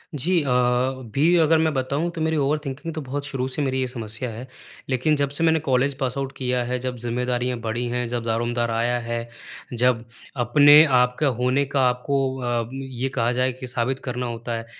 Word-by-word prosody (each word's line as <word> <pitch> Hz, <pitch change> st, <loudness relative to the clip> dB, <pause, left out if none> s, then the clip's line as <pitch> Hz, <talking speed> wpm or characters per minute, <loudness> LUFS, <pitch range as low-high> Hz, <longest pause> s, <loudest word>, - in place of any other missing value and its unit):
जी 170 Hz, +5 st, +2 dB
अ, 140 Hz, -, -2 dB
अभी 125 Hz, +4 st, +1 dB
अगर 160 Hz, -1 st, +4 dB
मैं 160 Hz, -1 st, +1 dB
बताऊँ 140 Hz, +5 st, -1 dB
तो 165 Hz, -2 st, -6 dB
मेरी 160 Hz, 0 st, +1 dB
ओवरथिंकिंग 145 Hz, +2 st, -2 dB
तो 155 Hz, -, -4 dB
बहुत 140 Hz, +1 st, -4 dB
शुरू 130 Hz, -3 st, -2 dB
से 130 Hz, +3 st, -3 dB
मेरी 130 Hz, -2 st, 0 dB
ये 130 Hz, -, 0 dB
समस्या 115 Hz, 0 st, -4 dB
है। 115 Hz, +3 st, -8 dB, 0.4 s
लेकिन 135 Hz, +4 st, +2 dB
जब 140 Hz, -1 st, 0 dB
से 145 Hz, +4 st, -1 dB
मैंने 160 Hz, -1 st, +4 dB
कॉलेज 135 Hz, +2 st, +2 dB
पासआउट 135 Hz, +1 st, -2 dB
किया 125 Hz, -1 st, 0 dB
है, 125 Hz, +1 st, -2 dB
जब 125 Hz, 0 st, -4 dB
ज़िम्मेदारियाँ 125 Hz, +1 st, -2 dB
बढ़ी 115 Hz, +2 st, -3 dB
हैं 125 Hz, 0 st, -2 dB
जब 120 Hz, 0 st, -3 dB
दारोमदार 120 Hz, +1 st, -1 dB
आया 120 Hz, +2 st, +1 dB
है, 115 Hz, 0 st, -4 dB, 0.4 s
जब 120 Hz, -1 st, +2 dB, 0.4 s
अपने 145 Hz, +5 st, +8 dB
आप 125 Hz, -3 st, +3 dB
के 155 Hz, -, +2 dB
होने 130 Hz, +1 st, +1 dB
का 135 Hz, -2 st, +2 dB
आपको 135 Hz, +1 st, -1 dB
अ, 120 Hz, -2 st, -1 dB
ये 135 Hz, -1 st, -4 dB
कहा 120 Hz, -3 st, 0 dB
जाए 125 Hz, +1 st, +1 dB
कि 130 Hz, +1 st, -8 dB
साबित 125 Hz, +1 st, -1 dB
करना 125 Hz, 0 st, -3 dB
होता 115 Hz, 0 st, -4 dB
है 115 Hz, -, -7 dB
125 Hz, 200 wpm, -23 LUFS, 120-140 Hz, 0.4 s, अपने